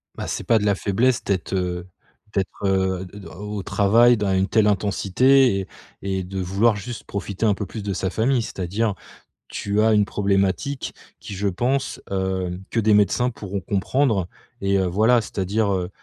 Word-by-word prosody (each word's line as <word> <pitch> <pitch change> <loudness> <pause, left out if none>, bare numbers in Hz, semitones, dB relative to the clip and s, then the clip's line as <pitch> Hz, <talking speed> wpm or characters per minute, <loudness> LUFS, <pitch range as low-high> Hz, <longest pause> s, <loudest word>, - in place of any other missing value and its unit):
Bah, - - -5
c'est - - -3
pas 115 - +3
de 105 - -2
la 100 -1 +3
faiblesse 115 +6 +1
d'être, 95 -2 -2
heu, 90 -1 -2 0.5
d'être, 100 +1 -2
heu, 95 -1 0
d 100 +2 -11
au 105 +5 -7
au 100 - -4
travail 115 +6 +4
dans 100 -2 0
une 95 +1 +2
telle 110 +1 +3
intensité 105 +4 +3
et 95 - -5 0.3
et 95 -1 -2
de 95 +1 -5
vouloir 100 +5 +2
juste 110 +4 -7
profiter 100 +1 -4
un 105 - +4
peu 100 - -4
plus 105 +2 -7
de 100 -1 -2
sa 95 +1 -1
famille. 120 +5 +1
C'est-à-dire 105 +1 -2 0.5
tu 100 +1 -1
as 110 0 +4
une 105 -1 +4
problématique 100 +7 -1 0.3
qui, - - -8
je 100 +1 -1
pense, 125 +8 -1
heu, 95 -2 -2
que 115 - 0
des 110 -1 +3
médecins 105 +5 +3
pourront 100 -3 -5
comprendre 100 +1 0 0.3
et 100 0 +2
heu, 95 - +1
voilà 110 +7 +3
c'est-à-dire, 100 +1 -1
heu 90 -2 -2
100 Hz, 185 wpm, -23 LUFS, 95-110 Hz, 0.5 s, travail